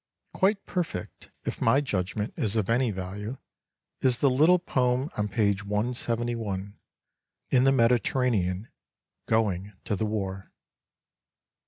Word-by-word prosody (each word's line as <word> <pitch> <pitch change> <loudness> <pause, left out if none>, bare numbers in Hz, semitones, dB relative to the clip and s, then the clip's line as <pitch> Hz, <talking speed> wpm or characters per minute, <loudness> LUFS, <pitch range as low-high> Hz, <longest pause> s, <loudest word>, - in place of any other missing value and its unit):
Quite 195 +1 +1
perfect, 165 - -4 0.2
if - - -4
my 120 +5 +4
judgment 105 -5 -2
is 105 -1 -1
of 110 0 +1
any 120 +1 +3
value, 100 +5 -5 0.6
is 125 -2 +4
the 140 0 +3
little 155 +8 +5
poem 130 -5 0
on 105 0 0
page 100 -1 +1
171, 110 -2 -2 0.8
"In 125 -1 +5
the 135 - +6
Mediterranean 115 -5 +2 0.3
— - - -59
Going 100 -2 -1
to 105 - 0
the 110 +3 -1
War." 95 -3 -4
115 Hz, 125 wpm, -27 LUFS, 100-125 Hz, 0.8 s, the